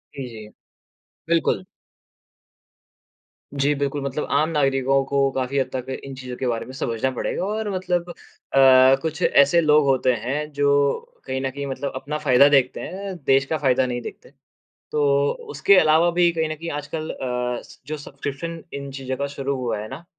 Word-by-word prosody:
जी, 135 -2 -5
जी। 110 -2 -10 0.8
बिल्कुल। 165 - +1 1.9
जी। 140 +1 +1
बिल्कुल 140 0 -2
मतलब 140 +2 -3
आम 150 +3 +2
नागरिकों 135 -3 +2
को 140 0 +1
काफ़ी 130 +1 -2
हद 130 -1 -1
तक 130 0 -4
इन 135 - -8
चीज़ों 130 -1 -7
के 130 - -2
बारे 115 -2 -2
में - - -10
समझना 125 -1 -2
पड़ेगा 130 +7 -3
और 215 +1 -2
मतलब 180 -1 -1
अ, 175 - -8 0.9
कुछ 160 +1 -4
ऐसे 140 +5 +5
लोग 150 -2 +4
होते 130 -2 +3
हैं 150 +5 -3
जो 145 0 +1 0.6
कहीं 130 0 -3
न 135 - -1
कहीं 140 +1 -5
मतलब 140 +1 -4
अपना 145 +3 -4
फ़ायदा 140 -1 +5
देखते 135 -3 +3
हैं 195 +2 -6
देश 135 0 +4
का 160 +3 -1
फ़ायदा 130 -3 +2
नहीं 120 -1 -3
देखते। - - -10 0.6
तो 150 - +1 0.5
उसके 155 +7 +4
अलावा 160 +1 +4
भी 175 0 +3
कहीं 160 -1 -1
न 155 - -3
कहीं 165 +2 -7
आजकल 155 +2 -5
अ, 125 -1 -3
स - - -17
जो 155 +1 -4
सब्सक्रिप्शन 150 +3 -6
इन 140 0 -6
चीज़ों 130 -1 -4
का 140 +2 -2
शुरू 140 -1 -3
हुआ 120 -4 -2
है 105 +1 -6
ना 170 - -9
140 Hz, 180 wpm, -23 LUFS, 130-155 Hz, 1.9 s, ऐसे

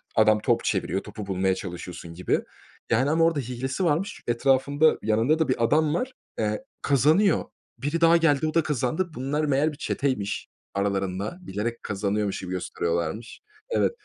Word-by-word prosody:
adam 110 0 +5
top 115 +2 +1
çeviriyor, 95 - -1
topu 105 0 -7
bulmaya 95 -1 +1
çalışıyorsun 90 -2 -7
gibi, 90 +2 0 0.5
yani, 130 +5 +3
ama 165 +1 +3
orada 165 -3 +2
hilesi 130 +5 -3
varmış. 170 +7 -1
Etrafında, 135 +5 +3
yanında 115 +9 +2
da 160 - +2
bir 125 -3 +1
adam 150 +5 +3
var, 250 +9 -2 0.3
eee, 105 -1 -1 0.2
kazanıyor. 155 - +3 0.3
Biri 150 +5 -2
daha 170 0 +7
geldi, 155 -2 +3
o 155 - -2
da 165 - +3
kazandı. 150 +5 -1
Bunlar, 145 +4 -1
meğer, 145 +2 +2
bir 145 - -11
çeteymiş. 130 -10 -2 0.3
Aralarında 100 - -1
bilerek 115 - -4
kazanıyormuş 100 0 -1
gibi 90 - -6
gösteriyorlarmış 85 +3 -3 0.3
Evet. 485 - +2
125 Hz, 155 wpm, -26 LUFS, 100-155 Hz, 0.5 s, daha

